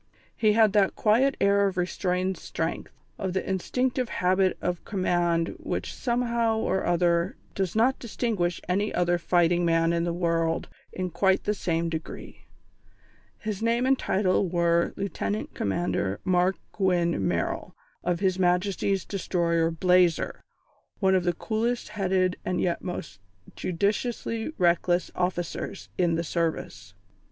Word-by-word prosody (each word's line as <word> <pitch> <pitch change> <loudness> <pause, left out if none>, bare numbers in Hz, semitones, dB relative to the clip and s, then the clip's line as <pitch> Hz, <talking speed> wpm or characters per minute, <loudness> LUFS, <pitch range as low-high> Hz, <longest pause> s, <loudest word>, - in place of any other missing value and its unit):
He 215 -2 +3
had 220 -2 +4
that 200 -2 +3
quiet 250 +6 +3
air 200 0 +4
of 190 -1 -4
restrained 180 +1 0
strength, 165 -1 -4 0.3
of 190 -2 -2
the 190 - -2
instinctive 250 +6 -1
habit 185 +1 +1
of 180 -1 -2
command 175 -4 +1
which - - -4
somehow 235 -2 0
or 190 -3 0
other 175 0 +2 0.2
does 190 -2 -2
not 245 +4 +3
distinguish 210 -7 -1
any 200 +4 0
other 175 0 +1
fighting 175 0 +2
man 165 0 +2
in 170 0 +1
the 170 - 0
world 165 -1 0 0.2
in 185 -1 -4
quite 190 +3 +2
the 210 - +1
same 170 -4 -1
degree. 160 -1 -7 0.9
His 215 -2 -4
name 235 +2 +1
and 270 +1 +4
title 190 -5 +1
were 170 -1 +2
Lieutenant 110 - -3
Commander 100 - -1
Mark 185 +1 +3 0.2
Gwynne 175 - +1
Merrill, 85 -1 -2 0.3
of 175 0 -1
His 190 -1 +1
Majesty's 185 +1 +1
Destroyer 170 -4 0
Blazer, 180 0 +2 0.6
one 190 -2 +3
of 185 -2 +2
the 175 - +3
coolest 235 +4 -2
headed 185 -2 0
and 180 - -1
yet 170 -2 0
most 100 - -6 0.4
judiciously 220 - -1
reckless 175 0 +2
officers 180 +1 -3
in 170 -2 +3
the 165 - -1
Service. 165 0 -3
180 Hz, 135 wpm, -26 LUFS, 170-200 Hz, 0.9 s, had